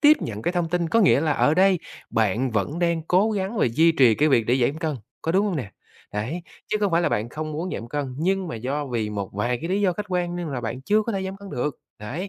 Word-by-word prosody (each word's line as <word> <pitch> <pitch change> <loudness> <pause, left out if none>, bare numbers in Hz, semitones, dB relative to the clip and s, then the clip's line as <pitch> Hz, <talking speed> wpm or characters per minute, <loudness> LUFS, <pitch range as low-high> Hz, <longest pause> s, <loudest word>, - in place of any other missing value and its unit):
tiếp 300 0 +7
nhận 110 -1 -5
cái 175 - 0
thông 175 -2 0
tin, 175 -1 0
có 230 - +3
nghĩa 185 -8 +5
là 155 -1 +2
ở 150 +1 +3
đây 190 0 +4 0.3
bạn 115 +4 +1
vẫn 115 +9 -1
đang 170 -2 +1
cố 190 +7 +3
gắng 200 +2 -2
và - - +4
duy 160 +8 +4
trì 125 -7 +5
cái 150 +7 +3
việc 115 -5 +3
để 125 - +3
giản 130 +3 +2
cân, 155 -4 -2 0.3
có 165 - 0
đúng 195 +3 +3
hông 185 -5 -1
nè? 115 -8 -4 0.4
Đấy, 130 +12 -3 0.3
chứ - - +1
không 200 -4 +1
phải 170 +1 +3
là - - +2
bạn 110 +3 -1
không 155 +2 -5
muốn 170 +5 -3
giảm 115 - -6
cân, 140 -1 -3
nhưng 190 +2 0
mà - - -4
do 140 +5 -3
vì 115 -4 -2
một 100 -2 -3
vài 120 +4 -1
cái 165 - -3
lý 200 +2 +1
do 190 -3 +3
khách 210 +3 -5
quan, 175 -1 -1
nên 175 -3 -3
là 130 -3 -3
bạn 120 +3 -4
chưa 215 +8 +3
có 230 +1 -3
thể 195 -1 -2
giảm 190 +1 -5
cân 200 -1 -11
được. 130 +2 -3 0.2
Đấy. 145 - -5
160 Hz, 285 wpm, -24 LUFS, 125-185 Hz, 0.4 s, tiếp